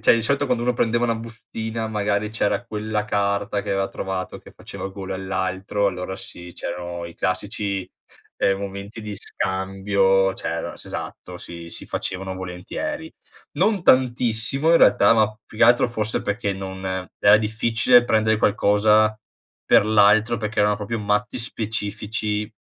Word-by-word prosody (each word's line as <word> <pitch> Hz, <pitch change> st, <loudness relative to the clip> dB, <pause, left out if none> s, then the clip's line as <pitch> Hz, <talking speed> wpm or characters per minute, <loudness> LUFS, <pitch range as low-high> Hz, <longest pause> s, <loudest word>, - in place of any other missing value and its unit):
cioè, -, -, +6 dB
di 115 Hz, -, 0 dB
solito 140 Hz, +5 st, +1 dB
quando 120 Hz, -3 st, 0 dB
uno 125 Hz, -, +2 dB
prendeva 120 Hz, 0 st, +1 dB
una 115 Hz, -1 st, +1 dB
bustina 115 Hz, 0 st, -5 dB
magari 105 Hz, 0 st, -1 dB
c'era 110 Hz, +1 st, 0 dB
quella 105 Hz, -1 st, -3 dB
carta 100 Hz, 0 st, 0 dB
che 100 Hz, -, -5 dB
aveva 95 Hz, 0 st, +1 dB
trovato 95 Hz, -1 st, -4 dB
che -, -, -16 dB
faceva -, -, -7 dB
gola 95 Hz, -1 st, -6 dB
all'altro, 95 Hz, +1 st, -1 dB
allora 95 Hz, 0 st, -5 dB
sì, 90 Hz, -2 st, -10 dB
c'erano 85 Hz, 0 st, -5 dB
i 85 Hz, -1 st, -9 dB
classici, 100 Hz, 0 st, -2 dB, 0.5 s
ehm, 95 Hz, 0 st, +2 dB
momenti 100 Hz, +2 st, -7 dB
di 105 Hz, -1 st, -5 dB
scambio, 95 Hz, 0 st, +1 dB
cioè -, -, -5 dB
er 85 Hz, 0 st, -3 dB
esatto, 90 Hz, -, -7 dB
sì, 85 Hz, -1 st, -9 dB
si -, -, -6 dB
facevano 95 Hz, 0 st, -4 dB
volentieri. 95 Hz, -, -5 dB, 0.5 s
Non 210 Hz, -4 st, +2 dB
tantissimo 125 Hz, +2 st, +2 dB
in 170 Hz, -, +6 dB
realtà, 100 Hz, -, +6 dB
ma 110 Hz, -1 st, +2 dB
più 110 Hz, -, -14 dB
che -, -, +7 dB
altro 120 Hz, +1 st, +5 dB
forse 110 Hz, -2 st, -2 dB
perché 100 Hz, -1 st, -1 dB
non 95 Hz, 0 st, -7 dB, 0.4 s
era 100 Hz, +1 st, +7 dB
difficile 115 Hz, +3 st, +3 dB
prendere 110 Hz, -1 st, +2 dB
qualcosa 105 Hz, +1 st, +3 dB, 0.5 s
per 100 Hz, -, +5 dB
l'altro, 110 Hz, +2 st, +4 dB
perché 105 Hz, -1 st, -2 dB
erano 105 Hz, 0 st, +3 dB
proprio 105 Hz, +2 st, -4 dB
mazzi 105 Hz, +3 st, -1 dB
specifici, 105 Hz, -1 st, -3 dB
105 Hz, 150 wpm, -23 LUFS, 95-110 Hz, 0.5 s, che